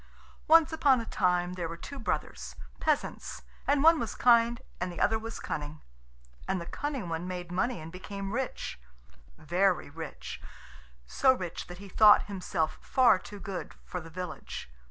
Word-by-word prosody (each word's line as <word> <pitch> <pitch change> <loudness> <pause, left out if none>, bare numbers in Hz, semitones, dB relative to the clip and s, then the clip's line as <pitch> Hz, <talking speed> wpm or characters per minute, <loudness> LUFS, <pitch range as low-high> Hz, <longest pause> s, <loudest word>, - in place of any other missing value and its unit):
Once 320 0 +6
upon 275 -5 +4
a 230 - -4
time 180 -3 +1
there 175 -3 -3
were 170 - -6
two 280 +10 -8
brothers, 225 - -3 0.2
peasants, 305 -2 -1 0.2
and 285 0 +3
one 325 0 +7
was 230 - -3
kind 235 -1 +4 0.2
and 180 0 -2
the 175 - -7
other 220 +1 +3
was 225 +1 -6
cunning. 150 0 -5 0.7
And 190 - 0
the 170 - -6
cunning 270 0 -4
one 165 +1 -3
made 180 -1 -5
money 190 +5 0
and 160 +1 -8
became 195 +2 -6
rich 260 - -3 0.6
very 175 0 +1
rich 160 0 -7 0.6
so 260 - +4
rich 180 -9 -5
that 175 - -9
he 200 +2 -10
thought 210 +2 +7
himself 180 -5 -2
far 240 -7 +4
too 205 +1 -10
good 195 -2 -6
for 180 - -5
the 165 - -11
village. 180 - -6
190 Hz, 165 wpm, -30 LUFS, 175-240 Hz, 0.7 s, one